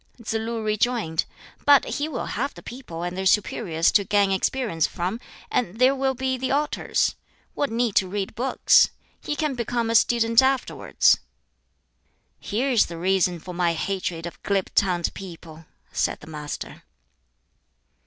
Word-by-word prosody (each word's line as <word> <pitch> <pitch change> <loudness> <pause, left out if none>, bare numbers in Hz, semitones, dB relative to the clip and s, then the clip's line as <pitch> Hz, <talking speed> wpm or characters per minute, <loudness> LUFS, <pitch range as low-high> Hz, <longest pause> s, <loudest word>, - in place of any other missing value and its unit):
Tsz 225 -1 -4
lu 225 0 -2
rejoined, 215 -6 0 0.4
"But 285 -1 +6
he 290 - -2
will 310 - -4
have 275 +6 -3
the - - -12
people 240 -10 -8
and 175 0 -3
their 190 0 0
superiors 180 -5 +2
to 205 - +4
gain 205 -1 +2
experience 195 -3 0
from, 185 +5 -3 0.3
and 220 -4 -1
there 255 +2 +5
will 265 -1 0
be 260 +1 -1
the 260 - -2
altars; 290 +2 0 0.4
what 285 - -1
need 230 -1 0
to 190 - +3
read 195 +1 -3
books? 250 +4 +4 0.3
He 295 - -3
can 305 -2 -1
become 235 -1 -1
a - - 0
student 230 0 +4
afterwards." 265 -1 +2 1.2
"Here 250 +7 -1
is 235 - +4
the 170 - -7
reason 185 0 +1
for 180 +2 -9
my 175 -1 +1
hatred 175 -1 -3
of 170 - -8
glib 195 -2 -1
tongued 180 -4 +1
people," 165 -4 -10 0.2
said - - -1
the - - -13
Master. 150 -2 -7
210 Hz, 155 wpm, -24 LUFS, 180-250 Hz, 1.2 s, But